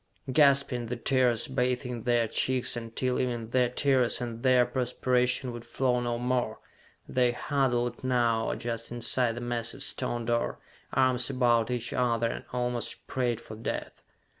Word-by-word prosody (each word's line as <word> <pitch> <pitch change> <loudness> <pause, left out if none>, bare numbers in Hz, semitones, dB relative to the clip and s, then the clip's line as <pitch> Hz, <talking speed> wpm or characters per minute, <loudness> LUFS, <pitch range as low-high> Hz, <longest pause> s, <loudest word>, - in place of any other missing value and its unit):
Gasping, 140 -4 +3
the 125 - -3
tears 120 -1 +1
bathing 125 -2 -1
their 120 -2 +2
cheeks 130 +2 +1
until 120 +2 -2
even 120 -3 -2
their 125 -1 +3
tears 130 -1 +2
and 120 -2 -5
their 125 -1 +5
perspiration 125 0 0
would 120 -1 -8
flow 125 -1 0
no 120 -1 -1
more, 125 -2 -1 0.5
they 125 -1 +2
huddled 120 -3 0
now 120 -3 +1
just 115 -1 -4
inside 120 0 +1
the 120 - -5
massive 120 -1 -2
stone 120 -1 -1
door, 120 0 0 0.3
arms 130 -1 +2
about 120 -3 +2
each 125 -1 -2
other, 115 -2 +1
and - - -7
almost 125 -1 -2
prayed 120 -3 -1
for 110 - -10
death. 110 - -5
125 Hz, 145 wpm, -28 LUFS, 120-125 Hz, 0.5 s, their